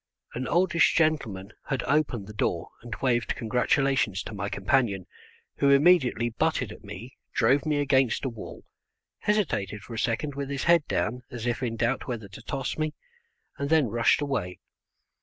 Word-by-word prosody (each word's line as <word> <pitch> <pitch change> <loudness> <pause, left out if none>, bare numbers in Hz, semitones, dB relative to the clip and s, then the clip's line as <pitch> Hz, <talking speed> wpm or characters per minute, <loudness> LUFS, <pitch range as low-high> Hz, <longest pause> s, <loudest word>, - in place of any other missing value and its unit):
An 125 +1 -3
oldish 170 -1 +3
gentleman 115 - 0 0.2
had 135 -3 -1
opened 140 -7 +1
the 105 - -10
door 85 -5 -1
and 120 -3 -6
waved 120 -3 +1
congratulations 125 -3 +1
to - - -7
my 100 0 -3
companion, 100 -2 +1 0.5
who 140 - +3
immediately 140 -6 +4
butted 125 -3 0
at - - -12
me, 110 +5 -9 0.2
drove 135 +6 +3
me 150 -1 +2
against 135 -3 +2
a - - +1
wall, 115 -3 -9 0.6
hesitated 110 - -1
for 120 - -9
a 115 - -3
second 135 +5 -1
with 140 0 -4
his 140 -1 -2
head 170 -3 +4
down 125 +4 -1
as 120 -2 -6
if 120 0 -1
in 120 -3 -2
doubt 120 +3 -1
whether 115 -5 -4
to 95 - -12
toss 135 +2 -4
me, 155 -1 -1 0.6
and 140 0 -2
then 155 -6 +4
rushed 115 +5 +3
away. 115 -11 -2
125 Hz, 170 wpm, -27 LUFS, 110-140 Hz, 0.6 s, immediately